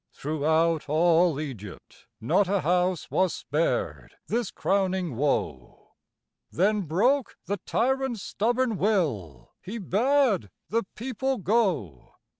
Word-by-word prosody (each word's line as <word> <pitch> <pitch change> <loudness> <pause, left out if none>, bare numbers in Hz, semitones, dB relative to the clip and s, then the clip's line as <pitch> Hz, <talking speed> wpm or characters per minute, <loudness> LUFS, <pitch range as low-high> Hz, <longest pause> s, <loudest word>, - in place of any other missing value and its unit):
Throughout 155 +2 0
all 165 0 +3
Egypt, 115 -10 -9
not 185 - +2
a 195 0 +1
house 180 +1 0
Was 185 -2 +1
spared 155 +4 -2
this 235 -3 -1
crowning 190 -6 -1
woe. 115 - -2 0.6
Then 205 +4 +2
broke 225 - +1
the 200 +2 -2
tyrant's 265 -3 0
stubborn 240 0 0
will; 130 - -1
He 210 +5 -6
bade 225 - +1 0.2
the 230 0 0
people 265 +3 -2
go. 180 - -1
185 Hz, 105 wpm, -26 LUFS, 155-225 Hz, 0.6 s, all